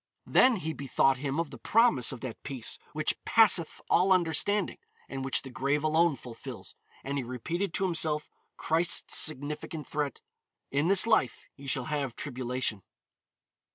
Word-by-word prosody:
Then 255 -1 +4
he 160 -5 -4
bethought 135 -1 +1
him 140 +2 -2
of 165 -3 -2
the 135 - -10
promise 225 - +3
of 130 - -8
that 125 -4 -7
peace 130 -5 -3
which 155 0 -2
passeth 200 -7 +4
all 185 +2 +3
understanding, 185 +3 +2 0.3
and 135 -1 -5
which 135 - -1
the 130 - -9
grave 140 +4 -1
alone 160 0 +3
fulfills, 120 -3 -9 0.3
and 140 +1 -3
he - - -3
repeated 165 - -3
to - - -1
himself 160 -4 +1 0.3
Christ's 165 +2 +1
significant 150 +1 -1
threat, 145 -3 -3 0.5
"In 145 +4 +1
this 195 +2 +7
life 130 - +1
ye 140 0 -12
shall 135 -2 0
have 145 -5 -3
tribulation." 125 -5 -3
150 Hz, 155 wpm, -29 LUFS, 135-170 Hz, 0.5 s, this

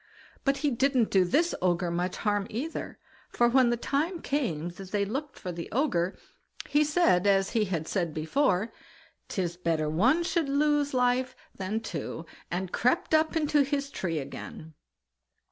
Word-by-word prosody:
But 275 0 +2
he 290 - +3
didn't 260 -2 +2
do 190 -2 +5
this 300 - +2
Ogre 175 -1 +1
much 180 +1 -2
harm 205 -2 0
either, 280 +10 -5 0.3
for 240 - +3
when 250 0 +4
the 240 - +1
time 310 +8 -1
came 185 - -2
that 185 +2 -10
they 200 0 0
looked 275 +7 -4
for 180 - -5
the 170 -1 -6
Ogre, 195 - 0 0.5
he 295 +1 +3
said, 295 - +3
as 195 -1 +3
he 220 -2 +2
had 165 -5 -3
said 175 -5 -1
before: 185 - +1 0.6
"'Tis 175 -3 -2
better 165 -3 0
one 235 - +3
should 335 -4 0
lose 290 0 +2
life 250 +1 +1 0.2
than 195 +4 -3
two", 165 -5 -5 0.2
and 180 +1 -3
crept 255 +8 +1
up 315 +1 +3
into 300 -2 +3
his 280 0 -1
tree 170 -9 -2
again. 155 +2 -7
225 Hz, 160 wpm, -28 LUFS, 180-280 Hz, 0.6 s, do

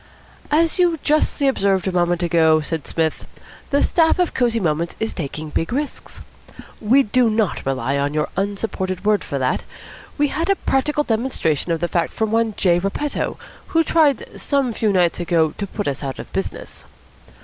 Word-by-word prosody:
"As 325 +3 +2
you 345 -2 +3
justly 295 -1 +2
observed 195 -7 +1
a - - +1
moment 175 0 +1
ago," 160 -2 +4
said 155 0 -4
Psmith, 160 -1 -2 0.4
"the 285 - +2
staff 325 -2 +3
of 360 -2 +1
Cosy 235 -2 +1
Moments 165 -2 -1
is 220 0 -2
taking 155 -1 -5
big 165 +2 -2
risks. 285 +4 -4 0.6
We 250 +6 +4
do 240 +2 +2
not 215 -3 0
rely 135 +1 0
on 140 +1 0
your 150 - +1
unsupported 195 -1 -3
word 210 -3 +2
for 140 - -4
that. 130 -1 0 0.5
We 290 -1 +2
have 330 +4 -2
had 395 -1 0
practical 295 +2 +1
demonstration 220 - -1
of 165 -1 -1
the 175 - +1
fact 170 -1 -1
from 220 -1 -1
one 225 -1 +1
J. 175 -2 +3
Repetto, 195 +10 -2 0.3
who 330 0 +2
tried 305 -5 +1
some 275 -4 0
few 215 -1 +1
nights 180 -3 +2
ago 165 -2 +1
to 200 - -2
put 205 +1 -4
us 140 -2 -2
out 135 -2 -4
of - - -10
business. - - -5
200 Hz, 180 wpm, -20 LUFS, 165-270 Hz, 0.6 s, ago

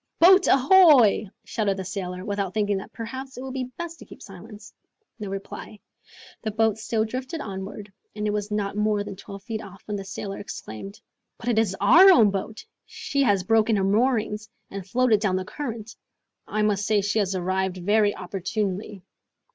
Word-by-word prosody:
"Boat 375 +3 +6
ahoy!" 270 - +6
shouted 200 -3 -1
the 190 - -5
sailor, 180 0 -5
without 200 -2 -3
thinking 205 -2 +1
that 190 - -8
perhaps 260 +3 -7
it 250 - -6
would 265 -1 -6
be 260 -1 -2
best 335 +6 -8
to - - -12
keep - - -14
silence. 205 +2 -12 0.5
No 210 -2 -5
reply. 195 +2 -7 0.6
The 220 - -2
boat 220 0 +1
still 220 0 0
drifted 255 +8 -5
onward, 200 -2 -7 0.2
and 210 0 -3
it 210 - +1
was 210 0 -2
not 205 -1 -2
more 210 -1 +1
than 205 -1 -7
twelve 195 +1 -10
feet 225 -1 -4
off, 195 -1 -12
when 210 -1 -3
the 195 - -6
sailor 195 0 -6
exclaimed, 195 - -8 0.4
"But 240 - -4
it 225 -2 +3
is 205 -4 +1
our 375 +4 +8
own 225 - +6
boat! 200 +3 -5 0.2
she 280 - -3
has 205 -8 +3
broken 220 +2 +3
her 195 - +1
moorings, 215 0 +1 0.2
and 195 -1 -7
floated 245 -1 +3
down 200 -3 0
the 185 0 -2
current. 230 -6 -6 0.5
I 215 0 -1
must 205 0 +1
say 215 -2 +3
she 205 +2 0
has 195 -2 0
arrived 185 +1 -1
very 205 +3 +2
opportunely." 195 +1 -4
210 Hz, 185 wpm, -25 LUFS, 195-225 Hz, 0.6 s, our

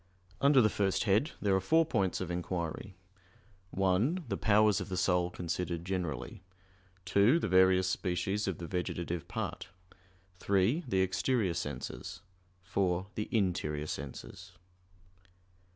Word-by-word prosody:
Under 140 -1 +6
the - - +5
first 100 -2 0
head 110 +9 +2
there 100 -2 +2
are 95 - +1
four 160 - +3
points 100 - 0
of 90 -2 -4
inquiry: 90 +1 -4 0.7
(1) 100 - +1
The - - 0
powers 105 -1 +3
of - - -6
the 90 - -3
soul 90 -1 +2
considered 85 -1 -4
generally; 90 -6 -4 0.6
(2) 100 - +4
The - - -1
various 95 0 +4
species 95 +2 -1
of 95 -5 -2
the 85 - -6
vegetative 85 -2 -3
part; - - -4 0.7
(3) 100 - +1
The 95 -5 +1
exterior 95 +1 +1
senses; 85 +5 -5 0.4
(4) 95 0 -1
The 105 - -4
interior 85 -8 0
senses. 90 +7 -7
95 Hz, 130 wpm, -31 LUFS, 90-105 Hz, 0.7 s, Under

